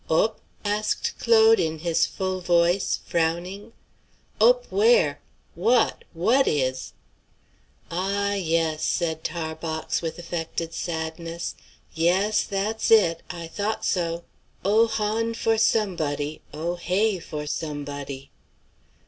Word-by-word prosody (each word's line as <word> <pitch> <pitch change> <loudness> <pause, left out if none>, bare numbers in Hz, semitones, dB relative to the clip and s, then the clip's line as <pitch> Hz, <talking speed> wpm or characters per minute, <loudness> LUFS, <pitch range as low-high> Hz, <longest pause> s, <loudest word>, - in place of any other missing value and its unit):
"Op?" 215 +7 +2 0.2
asked 210 +1 0
Claude, 225 -1 +6
in 160 -1 0
his 165 +1 +1
full 185 -1 -3
voice, 175 +2 +2
frowning. 175 +6 -1 0.7
"Op - - +5
where? 470 +4 +4 0.4
w'at, 240 -1 +2
w'at 230 +11 +3
is?" 130 -3 -1 1.0
"Ah, 200 +3 0
yes!" 165 -4 0
said 160 -2 -1
Tarbox, 160 -1 -3
with 165 -1 -4
affected 165 -1 -4
sadness. 165 0 -4 0.4
"Yes, 190 +6 +2
that's 210 +3 -2
it; 175 -7 +5
I 170 -2 -6
thought 205 +6 -3
so. 170 -2 -1 0.4
'Oh 220 +3 +5
hon 220 +1 -1
for 225 -1 +1
somebody, 155 -10 0
oh 170 +3 -3
hey 190 +3 +1
for 150 -2 -6
somebody.'" 145 -2 -5
175 Hz, 105 wpm, -25 LUFS, 160-210 Hz, 1.0 s, Claude